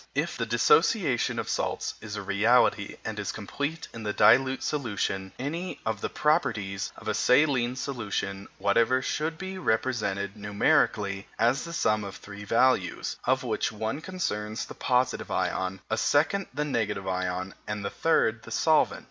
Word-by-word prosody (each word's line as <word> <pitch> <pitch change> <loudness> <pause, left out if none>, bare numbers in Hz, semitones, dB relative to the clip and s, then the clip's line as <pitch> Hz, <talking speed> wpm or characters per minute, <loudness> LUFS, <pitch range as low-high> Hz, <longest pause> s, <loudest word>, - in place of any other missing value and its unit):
If - - -1
the - - -2
dissociation 205 - +3
of - - -2
salts - - -2
is 110 -1 -6
a 105 - -4
reality 100 +1 +3
and 110 -1 -4
is 100 - -2
complete 145 +9 -4
in 115 - -7
a - - +1
dilute 130 +5 +4
solution, 100 -8 -2
any 165 +7 -4
of 110 -2 -2
the - - -2
properties 105 - 0
of - - -11
a - - +1
saline 125 -3 +3
solution 100 -7 -3
whatever 115 +6 +2
should 155 +4 -2
be 190 +1 -6
represented 110 - -1
numerically 100 -1 +1
as 120 +6 +2
the 170 - -7
sum 110 -10 +1
of 100 -1 -7
three 100 0 -10
values, 115 -5 +1
of - - +2
which - - -1
one 110 +7 -3
concerns 115 - -3
the - - -9
positive 125 0 0
ion, 95 +1 -1
a 110 - -1
second 160 +7 +2
the 150 +3 -2
negative 110 -8 -1
ion, 95 0 -2
and 105 -1 -3
the 100 - -2
third 115 -8 +2
the - - -12
solvent. 155 +7 +2
110 Hz, 160 wpm, -27 LUFS, 100-140 Hz, -, dilute